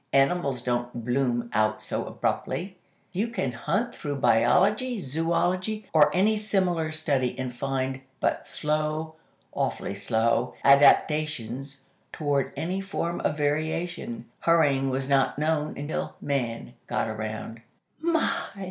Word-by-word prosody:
Animals 135 -2 +2
don't 120 -1 -2
'bloom' 120 -2 0
out 110 0 +2
so 105 - -3
abruptly. 185 +2 -2 0.4
You 200 +5 0
can 230 - -2
hunt 205 - -1
through 145 -2 -4
Biology, 180 - +3
Zoology 180 +7 0
or 150 -2 +6
any 210 +4 +3
similar 185 -6 0
study, 140 -5 0
and 130 -1 -4
find 135 0 -2 0.2
but - - 0
slow, 155 +1 -1 0.4
awfully - - -2
slow, 110 +3 +1
adaptations 140 -2 +3 0.3
toward 145 -3 0
any 185 +4 -2
form 175 -3 -3
of 150 - -1
variation. 165 +9 -2
Hurrying 145 -5 +3
was 135 0 -1
not 135 -1 +2
known 155 0 0
until 145 +2 -3
Man 125 -5 -2
got - - 0
around." 110 +1 -5 0.4
"My!" 325 0 +1
145 Hz, 120 wpm, -27 LUFS, 125-175 Hz, 0.4 s, or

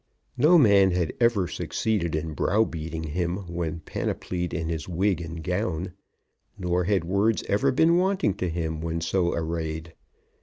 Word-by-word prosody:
No 155 +8 +6
man 100 - +6
had 90 -3 0
ever 115 -6 +3
succeeded 90 -7 -1
in 80 0 -3
browbeating 80 -4 0
him 85 +3 -2
when 85 -2 -3
panoplied 90 +2 -3
in 80 -2 -3
his 80 0 -4
wig 90 0 +1
and 80 0 -6
gown; 85 +4 -2 0.6
nor 90 0 0
had 100 -2 +1
words 100 +5 +1
ever 135 +7 +2
been 165 +6 +4
wanting 185 - +2
to 90 -3 -1
him 80 -1 -3
when 85 0 -2
so 85 +1 +1
arrayed. 80 0 -3
90 Hz, 150 wpm, -26 LUFS, 80-100 Hz, 0.6 s, No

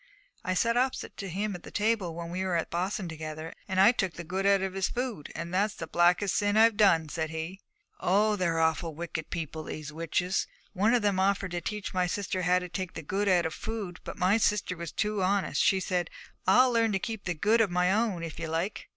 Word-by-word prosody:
I 185 -3 -1
sat 230 +5 +2
opposite 255 +1 -1
to 195 - -5
him 200 +4 -2
at 175 - -8
the - - -10
table 210 -6 0
when 170 0 -6
we 185 +2 -2
were 185 -2 0
at 165 - -1
Boston 185 +2 -2
together, 155 0 -6
and 190 -1 -1
I 195 +4 +8
took 190 -7 -1
the 170 - -7
good 190 +4 -1
out 200 -1 +4
of 190 -1 -2
his 195 -1 0
food, 240 - -4
and 170 +1 -5
it's 200 +3 +1
the - - -5
blackest 180 +3 +2
sin 205 0 +2
I 225 +1 +8
done," 195 -7 +3
said 160 +1 -3
he. 160 +4 -5 0.4
'Oh, 210 +3 +3
they're 170 -4 0
awful 160 0 +1
wicked 165 -1 -5
people, 160 -1 -4
these 150 -1 -6
witches! 165 +3 -1 0.3
One 210 +5 +3
of 235 - +1
them 200 -2 +2
offered 195 0 +1
to 175 0 -2
teach 210 +1 -4
my 180 -1 +1
sister 190 0 -2
how 180 +1 +3
to 180 0 -3
take 185 0 -4
the 165 - -6
good 195 +7 -1
out 180 -3 +4
of 160 - -2
food, 210 -5 -5
but - - -7
my 190 +3 +3
sister 210 -4 +1
was 170 -1 -6
too 210 -1 -1
honest; 195 +1 +1
she 190 - +4
said, 180 -2 -1 0.4
"I'll 250 +7 +6
learn 230 -2 +2
to - - +3
keep 220 +1 -5
the 175 -2 -1
good 215 +8 +3
of 215 - +3
my 180 +1 +2
own, 210 -6 0
if 165 -1 -6
ye 165 - -3
like." 165 +6 -3
185 Hz, 235 wpm, -29 LUFS, 170-205 Hz, 0.4 s, I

